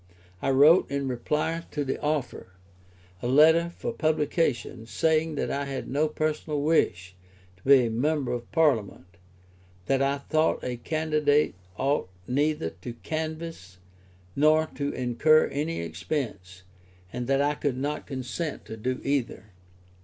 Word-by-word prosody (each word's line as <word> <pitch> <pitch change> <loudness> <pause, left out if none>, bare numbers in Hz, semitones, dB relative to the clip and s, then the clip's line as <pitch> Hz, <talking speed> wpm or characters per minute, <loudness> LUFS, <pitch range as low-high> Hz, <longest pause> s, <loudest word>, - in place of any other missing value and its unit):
I - - 0
wrote, 145 +6 +6
in 140 0 -2
reply 150 +6 -1
to 145 -1 -3
the 135 - -3
offer, 145 -10 -3 0.7
a - - -2
letter 160 +6 +5
for 170 - -5
publication, 150 -7 0
saying 160 +3 +1
that - - -2
I 140 0 -2
had 135 -1 -5
no 145 +4 +1
personal 155 -1 -2
wish 95 - +1 0.4
to 95 - -27
be 135 -2 +6
a - - -1
member 140 +3 0
of 120 -1 -5
Parliament, 135 - +1 0.8
that 135 0 +1
I 140 +1 +1
thought 155 +3 0
a 125 -1 -3
candidate 150 +1 +1 0.2
ought 140 -8 0 0.2
neither 145 - 0
to 90 +8 -8
canvass 155 - -5 0.6
nor 155 +2 +4
to 140 0 -2
incur 130 +6 +3
any 150 - -2
expense, 90 - -5 0.5
and 120 -1 -4
that 135 0 +2
I 145 +1 +2
could 145 -3 -2
not 145 +3 -3
consent 135 +4 -4
to 110 - -8
do 130 +4 -2
either. 130 -6 -2
140 Hz, 140 wpm, -27 LUFS, 125-155 Hz, 0.8 s, wrote